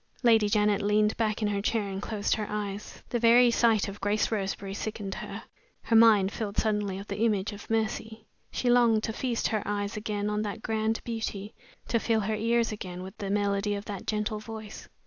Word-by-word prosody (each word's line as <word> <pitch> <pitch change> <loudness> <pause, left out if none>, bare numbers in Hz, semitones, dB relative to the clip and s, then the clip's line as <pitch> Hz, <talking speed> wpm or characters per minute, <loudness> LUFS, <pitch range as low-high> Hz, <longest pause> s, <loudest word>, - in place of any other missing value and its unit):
Lady 225 -3 +5
Janet 210 -1 +2
leaned 210 +1 +2
back 215 -1 -1
in - - +2
her 200 -1 -1
chair 215 0 0
and 195 0 -4
closed 210 -1 -1
her 215 -2 -2
eyes. 210 -1 -5
The 240 - 0
very 240 +1 +6
sight 230 -3 +3
of 200 0 -8
Grace 205 +3 +1
Roseberry 195 -2 -2
sickened 205 -1 -4
her. - - -7 0.4
Her 230 - +1
mind 215 -4 +6
filled 215 -3 -4
suddenly 210 -3 0
with 200 +1 -8
the 200 0 -4
image 210 -3 +1
of 205 - -11
Mercy. 220 0 -2 0.2
She 250 - -3
longed 235 -3 +4
to 225 - -2
feast 240 0 -1
her 215 -2 0
eyes 205 +1 -2
again 210 -1 -2
on 210 0 0
that 215 +1 -4
grand 220 0 -1
beauty, 220 -3 -4 0.3
to 230 - +1
fill 225 -1 +1
her 215 +2 -1
ears 230 +1 +1
again 185 -4 -6
with 190 0 -9
the 200 - -3
melody 200 0 0
of 200 +1 -6
that 200 -3 -6
gentle 215 0 -1
voice. 220 -1 -9
210 Hz, 205 wpm, -28 LUFS, 205-225 Hz, 0.4 s, very